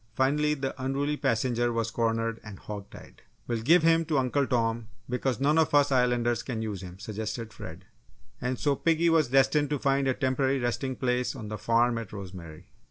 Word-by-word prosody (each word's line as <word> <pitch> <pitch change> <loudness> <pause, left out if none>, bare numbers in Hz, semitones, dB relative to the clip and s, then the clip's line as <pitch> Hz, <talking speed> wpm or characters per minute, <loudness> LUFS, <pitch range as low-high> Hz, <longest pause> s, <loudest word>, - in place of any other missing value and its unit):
Finally, 150 +4 +2
the 135 -2 -3
unruly 140 +3 0
passenger 120 -1 0
was 115 -1 -1
cornered 115 0 -1
and 110 -3 -9
"hog 100 0 -8
tied." - - -14 0.3
"We'll 115 -2 -2
give 165 +8 +5
him 165 0 +4
to 155 -2 0
Uncle 135 +1 +1
Tom, 115 -2 0 0.2
because 125 -1 -1
none 150 +4 +3
of 155 -2 +2
us 145 -1 +4
Islanders 120 -2 +2
can 115 -4 -4
use 105 -4 -4
him," 90 -1 -9
suggested 110 +2 -5
Fred. - - -9 0.6
And 125 +1 -1
so 145 +2 +1
piggy 165 +3 +2
was 160 -3 +3
destined 135 +3 +3
to 150 - 0
find 135 0 +1
a 130 - +1
temporary 130 0 +1
resting 130 +1 -2
place 125 0 -1
on 110 -5 -7
the 105 - -4
farm 115 +2 +2
at 115 -4 -8
Rosemary. 90 -5 -9
125 Hz, 190 wpm, -28 LUFS, 115-140 Hz, 0.6 s, give